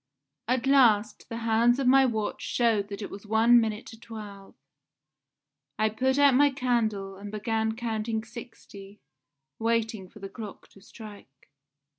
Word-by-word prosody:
At 255 +1 0
last 230 -6 +3
the 230 - -5
hands 230 +2 +3
of 275 - -1
my 265 +1 +5
watch 220 -3 -3
showed 225 -4 +1
that 205 +1 -7
it - - -7
was 205 +1 -10
one 230 +2 +5
minute 220 0 -3
to 225 - -12
twelve. 210 -4 -10 1.2
I 215 +1 +2
put 260 +5 0
out 285 -1 +5
my 285 +3 +5
candle 225 -7 -1
and 200 +1 -9
began 220 +1 -1
counting 225 -1 -3
sixty, 220 -3 -12 0.6
waiting 225 -4 -1
for - - -16
the 200 -1 -7
clock 205 +1 -10
to 195 - -19
strike. 200 - -14
220 Hz, 150 wpm, -27 LUFS, 205-240 Hz, 1.2 s, my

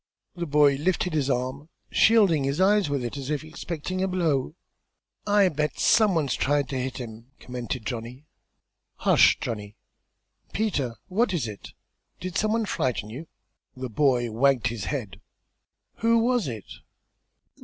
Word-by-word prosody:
The 175 -1 -4
boy 145 -1 +4
lifted 180 +3 0
his 145 -3 0
arm, 130 +4 -2 0.2
shielding 200 -10 +4
his 140 +4 -1
eyes 200 -2 +4
with 140 -3 -1
it 120 - -5
as 135 0 -6
if 150 -1 -1
expecting 165 +3 -5
a 190 - +1
blow. 160 -6 0 0.7
"I 205 -1 +5
bet 150 -1 -2
some 215 -4 +4
one's 145 -6 +1
tried 145 -1 +1
ter 135 - -2
hit 130 +1 -3
him!" 115 -2 -8
commented 125 -2 -5
Johnny. 120 +5 -6 0.7
"Hush, - - +5
Johnny! 105 -2 -5 0.8
Peter, 150 - -1
what 195 +1 +1
is 145 -9 -1
it? 105 -2 -9 0.5
Did 180 -1 -6
some 215 +1 +1
one 225 -1 +1
frighten 120 - -2
you?" 145 +8 -8 0.5
The 130 0 -5
boy 125 -2 +2
wagged 125 +1 +2
his 115 -5 -5
head. 120 - -4 0.8
"Who 230 +1 +3
was 235 - +2
it?" 110 -5 -6
145 Hz, 150 wpm, -26 LUFS, 125-185 Hz, 0.8 s, I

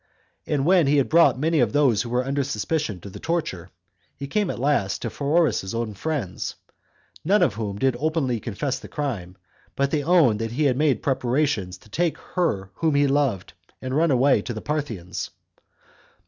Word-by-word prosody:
And 140 -2 0
when 175 -3 +4
he 145 +1 +3
had 140 - +2
brought 155 -6 +5
many 160 +3 +1
of 120 -5 +2
those 135 -8 +3
that 120 - -5
were 125 +1 0
under 140 +1 0
suspicion 130 - -2
to 100 - -9
the - - -9
torture, 125 - -3 0.5
he 140 - -5
came 205 +6 0
at - - -3
last 125 -7 0
to 115 - -3
Pheroras's 140 - +1
own 115 -2 -2
friends; 120 - -3 0.7
none 200 +6 +3
of 110 - +1
which 100 -2 -3
did 130 -2 +2
openly 145 -6 0
confess 120 +6 -3
the - - -10
crime, 105 - -4 0.4
but 140 0 0
they 150 -2 0
owned 150 -10 +4
that 115 0 -3
he 150 +5 0
had 135 -4 +3
made 145 -1 +1
preparation 130 - 0
to 90 +4 -12
take 165 +10 -1
her 100 - -2
whom 160 -3 0
he 145 0 +4
loved, 135 -11 0 0.3
and 130 0 -4
run 165 +2 +3
away 135 +1 +4
to 120 - -5
the 110 - -5
Parthians. 120 - -4
135 Hz, 190 wpm, -24 LUFS, 110-150 Hz, 0.7 s, brought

